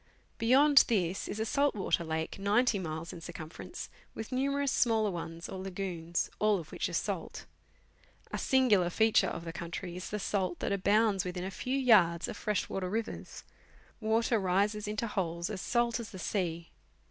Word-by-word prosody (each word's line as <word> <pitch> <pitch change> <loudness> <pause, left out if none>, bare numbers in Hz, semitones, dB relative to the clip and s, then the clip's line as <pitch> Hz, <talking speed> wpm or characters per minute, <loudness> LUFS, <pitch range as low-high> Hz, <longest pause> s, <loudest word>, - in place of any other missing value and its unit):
Beyond 275 +5 +6
this 190 -5 0
is 210 - -4
a 220 - 0
salt 280 +4 +2
water 190 -3 0
lake 160 +2 -3
90 210 +2 +2
miles 160 -1 -5
in 170 - -9
circumference, 165 -1 -7 0.3
with 220 - -6
numerous 275 +1 +1
smaller 220 -3 +2
ones 165 -1 -6
or 190 - -6
lagoons, 180 -3 -3
all 210 -1 +3
of 165 -4 -8
which - - -2
are - - -8
salt. - - -3 0.9
A - - -2
singular 225 -10 +3
feature 220 +4 +3
of 170 - -5
the 165 - -5
country 170 +1 -5
is 180 - -6
the 210 - -2
salt 190 -3 -1
that - - -2
abounds 200 0 +3
within 180 0 -4
a 190 - -4
few 255 +7 -2
yards 190 -10 +4
of - - -5
fresh 210 -1 -1
water 185 -1 -3
rivers; 225 +3 -4 0.6
water 225 +1 +2
rises 205 +3 +1
into 215 +2 -2
holes 175 -3 -2
as 190 -3 -4
salt 240 0 +1
as 225 -3 -6
the 195 - -9
sea. 170 -3 -2
200 Hz, 175 wpm, -31 LUFS, 175-225 Hz, 0.9 s, Beyond